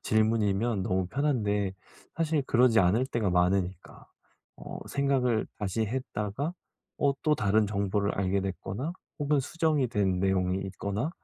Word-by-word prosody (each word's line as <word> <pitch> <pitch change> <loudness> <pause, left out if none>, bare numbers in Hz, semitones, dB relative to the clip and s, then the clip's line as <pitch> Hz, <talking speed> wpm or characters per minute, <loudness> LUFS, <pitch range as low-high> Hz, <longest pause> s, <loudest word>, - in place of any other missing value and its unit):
질문이면 110 -1 +1
너무 95 0 0
편한데 105 -8 0 0.4
사실 160 -2 +1
그러지 120 -2 +5
않을 95 +8 +3
때가 120 -6 -1
많으니까 90 +1 0 0.5
어 - - -8
생각을 130 -5 +1
다시 105 +2 -1
했다가 125 - -3 0.4
어 140 -1 +3
또 155 -1 +3
다른 105 -3 +2
정보를 100 0 0
알게 95 0 +1
됐거나 95 - -4 0.3
혹은 145 -1 +2
수정이 155 -2 0
된 95 -4 +1
내용이 95 -1 +1
있거나 100 - -3
105 Hz, 295 characters per minute, -29 LUFS, 95-130 Hz, 0.5 s, 그러지